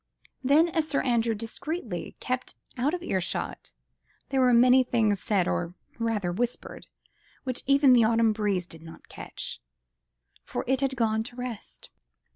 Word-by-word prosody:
Then, 290 +6 +5
as 320 -1 0
Sir 280 - 0
Andrew 235 -2 +1
discreetly 230 - -5
kept 255 0 -3 0.2
out 275 +7 0
of 350 - -7
earshot, 185 - -3 0.6
there 270 -1 +1
were 250 -1 +5
many 250 +2 +6
things 220 -5 +1
said—or 180 -3 0 0.2
rather 220 -6 0
whispered—which 245 +3 -6
even 275 -1 +6
the 240 -2 +6
autumn 225 0 +3
breeze 205 -4 0
did 165 -2 -12
not 165 0 -13
catch, - - -7 0.8
for - - -4
it 265 +2 +1
had 270 -1 0
gone 220 -3 +1
to 245 - -9
rest. 245 -4 -7
240 Hz, 140 wpm, -27 LUFS, 210-260 Hz, 0.8 s, many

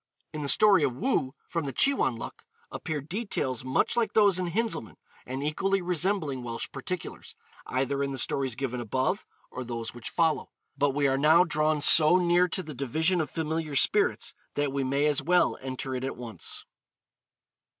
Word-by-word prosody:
In 155 - -4
the 140 - -2
story 205 0 +5
of 135 -4 0
Woo, 155 - -1
from 165 -3 -3
the 135 - -3
'Che 275 - +4
wan 130 - 0
luk,' - - -8 0.3
appear 155 -2 -4
details 155 - -3
much 130 +1 +1
like 235 -2 0
those 200 -4 +4
in 180 - -1
Hinzelmann, 215 - -2 0.3
and 130 +2 -4
equally 195 +6 0
resembling 175 -5 -1
Welsh 115 -1 -4
particulars, 170 +6 -6 0.3
either 135 +2 -1
in 140 0 -1
the 135 - -4
stories 130 0 0
given 125 -1 -3
above, 130 - -1 0.2
or 130 - -5
those 115 -2 -5
which 120 -1 -7
follow. 160 -2 0 0.3
But 140 -1 +1
we 145 -1 +2
are 135 0 +1
now 160 +4 +6
drawn 155 -2 0
so 155 +3 +7
near 175 0 +3
to 185 +2 -3
the 155 -2 -8
division 160 +7 0
of 150 - -4
Familiar 160 -1 -3
Spirits - - +2 0.2
that 145 -1 0
we 140 -1 -1
may 140 +2 +1
as 150 -2 +2
well 175 0 +2
enter 130 0 -5
it 130 0 -3
at 135 - -4
once. 115 -7 -6
145 Hz, 180 wpm, -27 LUFS, 130-175 Hz, 0.3 s, so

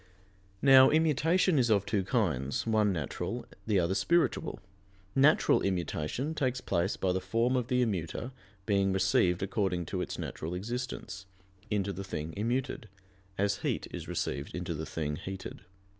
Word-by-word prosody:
Now, 135 -1 +8
immutation 160 +2 +3
is 120 -2 +2
of 100 -2 +3
two 105 -2 0
kinds, 85 - 0
one 110 -2 +3
natural, 80 -7 -3 0.2
the 105 -3 +3
other 85 +1 +1
spiritual. 165 - +1 0.5
Natural 140 +5 +4
immutation 95 - -2
takes 130 -4 -1
place 90 -5 -1
by 95 - +1
the 95 - -1
form 115 +6 +1
of 125 -2 0
the 125 0 +2
immuter 100 +4 -3 0.3
being 100 -2 +2
received 95 -1 +2
according 95 -3 -1
to - - -3
its - - -4
natural 80 +3 -5
existence, 105 -2 -5 0.4
into 100 -2 0
the 95 - -5
thing 80 -4 -5
immuted, 120 +4 -2 0.5
as 100 +1 +1
heat - - -2
is - - -6
received 70 - -3
into 90 -1 -3
the 80 0 -5
thing 75 -2 -3
heated. 95 +1 -7
100 Hz, 150 wpm, -30 LUFS, 90-125 Hz, 0.5 s, Now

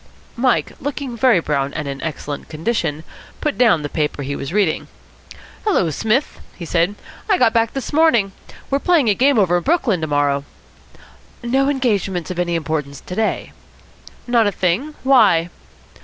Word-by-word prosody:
Mike, 250 0 +1
looking 275 -2 -4
very 235 -4 +4
brown 140 -3 -1
and 150 -2 -3
in 140 0 -5
excellent 150 -3 -5
condition, 160 -2 -2 0.4
put 300 - -1
down 215 -11 +3
the - - -2
paper 150 -1 -2
he 140 +1 -3
was 135 +1 -5
reading. 195 -5 0 0.8
"Hullo, 280 - +1
Psmith," 220 - 0 0.2
he 170 - -7
said. 175 +4 +1 0.3
"I 390 - +4
got 225 - +3
back 230 -1 +1
this 270 +1 -5
morning. 260 -11 +3 0.4
We're 275 - +2
playing 310 -7 +3
a - - +5
game 270 +5 +3
over 180 -4 +3
in - - -1
Brooklyn 260 - +1
to 155 - -1
morrow." 145 -1 +1 1.0
"No 265 +3 +2
engagements 200 - -1
of 180 - -5
any 175 -1 0
importance 150 -4 -3
to - - -8
day?" 220 +1 -1 0.7
"Not 235 -3 +3
a - - +1
thing. 195 - -1
Why?" 205 -11 +4
195 Hz, 165 wpm, -19 LUFS, 160-255 Hz, 1.0 s, a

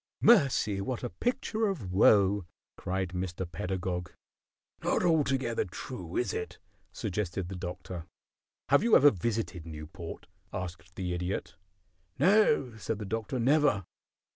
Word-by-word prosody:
"Mercy! 135 - +4
What 120 +5 -3
a 125 - -3
picture 230 -3 -1
of 140 - -3
woe!" 100 -1 +5 0.3
cried 95 0 -2
Mr. 90 0 -3
Pedagog. 90 +1 -3 0.7
"Not - - +1
altogether 135 -8 +2
true, 90 -1 -6
is 120 - 0
it?" 90 - -4 0.3
suggested 95 -2 -3
the 95 - -5
Doctor. 90 -1 -6 0.6
"Have - - +6
you 230 +1 +5
ever 145 +1 +8
visited 105 -3 -2
Newport?" 80 +2 -8 0.3
asked 90 -1 -6
the 90 -2 -2
Idiot. 90 +2 -3 0.6
"No," 185 - +4
said 110 0 -3
the 105 - -5
Doctor, 115 +5 -3
"never." 130 - +3
100 Hz, 125 wpm, -30 LUFS, 90-130 Hz, 0.7 s, ever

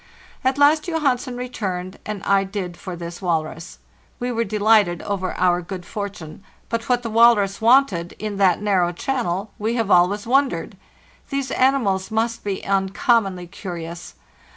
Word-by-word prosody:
At 260 +1 +1
last 295 +3 +4
Johansen 275 -6 0
returned, 190 -7 -4
and 210 -2 -5
I 195 -1 +3
did 190 -3 -5
for 180 +1 -7
this 170 +1 -8
walrus. 165 -1 -3 0.4
We 245 0 -2
were 230 -1 0
delighted 210 -4 +2
over 190 -2 -3
our 180 -1 +3
good 180 0 -7
fortune; 200 -5 -7 0.3
but 230 +1 -3
what 245 -1 +2
the 230 - -3
walrus 220 -3 +4
wanted 225 -8 +3
in 210 -2 -4
that 190 -3 +3
narrow 185 -4 +2
channel 205 -2 -2
we 220 +3 -1
have 225 -4 -1
always 180 +4 +4
wondered. 270 +3 +1 0.5
'These 275 -1 -2
animals 230 -8 +1
must 230 +1 -1
be 200 -2 -4
uncommonly 195 0 +1
curious. 170 -2 -8
205 Hz, 150 wpm, -22 LUFS, 180-235 Hz, 0.5 s, last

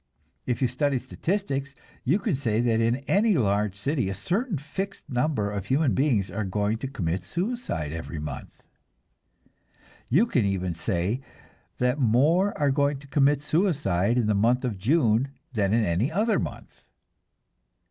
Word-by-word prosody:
If 125 +1 0
you - - +4
study 135 +3 0
statistics, 140 0 -3 0.3
you 145 +9 +3
can 210 -2 -1
say 115 -5 0
that 115 -2 +2
in 115 +1 +2
any 205 -1 +3
large 105 -3 +1
city 130 +1 -1
a 95 - -3
certain 190 - -1
fixed 190 +8 -6
number 125 -5 0
of 100 -1 -4
human 140 +2 +2
beings 120 - +1
are 105 +3 -2
going 105 +3 -1
to 135 - -3
commit 95 -9 -2
suicide 170 - -3
every 80 0 -6
month; 75 0 -7 1.5
you 170 - +4
can 130 - +1
even 95 -3 -1
say 90 +8 -1 0.6
that 125 +3 +1
more 150 - +3
are 145 -2 +2
going 140 +1 +1
to 140 - -14
commit 140 0 +2
suicide 140 - +1
in 120 - +2
the 105 - +2
month 120 +6 +2
of 110 -6 -3
June 130 - +2 0.2
than 100 -4 +1
in 115 0 +3
any 95 - 0
other 215 +6 +2
month. - - -7
125 Hz, 155 wpm, -26 LUFS, 105-150 Hz, 1.5 s, you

